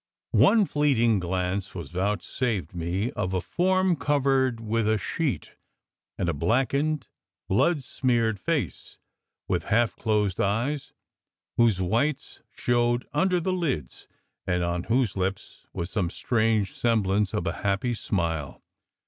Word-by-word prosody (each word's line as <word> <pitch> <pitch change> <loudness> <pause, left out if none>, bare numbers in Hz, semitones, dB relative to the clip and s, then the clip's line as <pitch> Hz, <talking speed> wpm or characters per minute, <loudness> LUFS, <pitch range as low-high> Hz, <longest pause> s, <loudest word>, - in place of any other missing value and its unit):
One 220 -3 +6
fleeting 125 - +2
glance 90 +2 -2
was 85 -2 -6
vouchsafed 100 - -1
me 90 +7 -2
of 95 0 -2
a - - +2
form 185 - +1
covered 135 -3 +1
with 110 0 0
a 110 - +3
sheet, 140 - -2 0.7
and 90 - -1
a 85 - +1
black 115 - +1
ened, 150 0 0 0.4
blood 140 - +2
smeared 120 -5 0
face, 140 - -3 0.5
with - - -1
half 115 +1 +2
closed 105 -4 0
eyes 130 +8 -1 0.7
whose 115 -5 +4
whites 115 +11 -1
showed 120 0 +1
under 180 +4 +2
the 185 +2 -1
lids, 140 - -3 0.4
and 90 -1 +1
on 85 0 -2
whose 120 -3 +1
lips 95 0 -4
was 85 +2 -5
some 95 -6 0
strange 110 -1 +1
semblance 105 -4 +1
of 105 - -2
a - - -3
happy 100 +5 0
smile. 85 -9 -2
110 Hz, 130 wpm, -26 LUFS, 95-135 Hz, 0.7 s, One